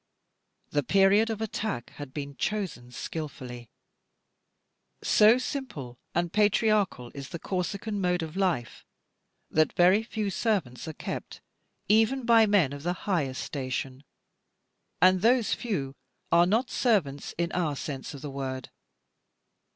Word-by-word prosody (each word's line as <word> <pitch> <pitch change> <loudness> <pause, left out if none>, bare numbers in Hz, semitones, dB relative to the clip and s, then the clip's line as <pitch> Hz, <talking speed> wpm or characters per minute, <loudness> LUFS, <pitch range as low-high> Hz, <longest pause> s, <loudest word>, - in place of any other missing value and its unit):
The 145 - +2
period 195 - +4
of 220 -1 -3
attack 215 - -3
had 145 -3 -7
been 140 0 -6
chosen 185 -14 -3
skilfully. 125 -6 -6 1.3
So 215 +3 +6
simple 250 - -5 0.2
and 175 0 0
patriarchal 205 - +2
is 140 -2 -7
the - - -5
Corsican 200 +4 -3
mode 180 -2 +1
of 160 +1 -7
life, 175 - -1 0.7
that 155 0 +3
very 185 +4 +5
few 220 -3 -3
servants 175 - -1
are 160 - -4
kept, - - -6 0.5
even 225 +5 +3
by 230 -2 +6
men 185 -10 +3
of 145 - -7
the 175 +3 -1
highest 150 -10 0
station; 130 -1 -4 1.0
and 185 0 +5
those 235 +1 +3
few 155 - -3 0.4
are 170 +1 +6
not 230 +6 +1
servants 165 - 0
in 170 0 -1
our 165 -5 0
sense 140 +1 -5
of 140 - -10
the 145 - -5
word. 130 -1 -5
175 Hz, 130 wpm, -28 LUFS, 140-210 Hz, 1.3 s, So